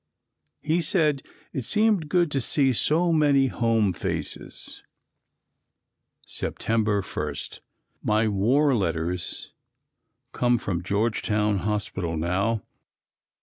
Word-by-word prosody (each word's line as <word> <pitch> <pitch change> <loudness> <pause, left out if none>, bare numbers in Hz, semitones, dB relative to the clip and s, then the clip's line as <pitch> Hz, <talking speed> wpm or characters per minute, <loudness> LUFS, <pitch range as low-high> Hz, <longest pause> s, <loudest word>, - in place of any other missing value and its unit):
He 160 +3 +1
said 155 -4 +2 0.3
it 130 - -3
seemed 210 - +2
good 175 -2 +2
to 135 - 0
see 135 +1 +2
so 165 +8 +2
many 145 -3 +4
home 115 -6 +1
faces. - - -5 1.4
September 105 -3 -1
1. - - -4 0.7
My 110 +1 +2
war 125 +9 +3
letters 85 -4 -2 0.8
come 120 0 +2
from 90 -6 -3
Georgetown 105 +1 0
Hospital 95 -4 -2
now. 95 +7 0
115 Hz, 95 wpm, -25 LUFS, 100-145 Hz, 1.4 s, many